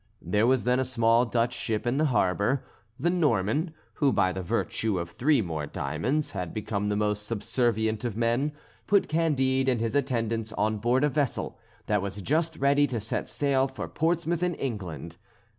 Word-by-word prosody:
There 105 +6 +1
was 130 -1 +3
then 125 +1 +2
a - - +2
small 115 -1 +3
Dutch 120 +1 +1
ship 110 0 -2
in 120 +3 +1
the 155 - +3
harbour. 105 0 +1 0.3
The 170 +6 +2
Norman, 150 - +1 0.2
who 140 -3 +2
by 95 - +2
the 95 - -4
virtue 100 +3 -1
of 85 -1 -4
three 140 - +2
more 80 -4 -4
diamonds 140 - -2
had 90 -4 -5
become 105 -1 -2
the 105 - 0
most 105 0 -1
subservient 110 0 0
of 115 -4 -3
men, 120 +5 +1 0.4
put 200 -1 +3
Candide 135 -5 +1
and 125 -3 +1
his 115 0 -1
attendants 115 -5 -1
on 110 0 0
board 120 +5 +2
a 150 - +4
vessel 140 -3 -1 0.3
that 105 -2 +1
was 100 +1 -4
just 160 - 0
ready 140 +1 +3
to 120 -3 -2
set 110 +2 -3
sail 135 -2 +1
for 130 - -6
Portsmouth 170 +1 0
in 180 -1 0
England. 90 - -5
120 Hz, 180 wpm, -27 LUFS, 105-140 Hz, 0.4 s, a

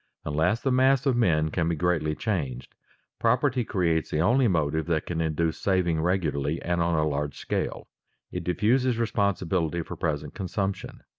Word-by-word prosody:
Unless 80 +10 +1
the 135 - 0
mass 130 +1 +3
of 135 -3 +3
men 80 -9 +2
can 85 -1 0
be 85 - 0
greatly 80 -2 0
changed, 70 - -3 0.5
property 125 +2 +2
creates 85 -6 0
the 75 - -1
only 120 +9 +4
motive 80 -4 0
that 80 -2 0
can 85 -2 -2
induce 80 0 -1
saving 90 -4 +1
regularly 80 -4 0
and 85 0 0
on 85 0 +1
a 75 0 +2
large 75 -1 -2
scale. - - -3 0.4
It - - -4
diffuses 120 +6 +1
responsibility 95 -7 0
for - - -7
present 75 -2 -3
consumption. 95 +1 -4
85 Hz, 160 wpm, -26 LUFS, 80-105 Hz, 0.5 s, only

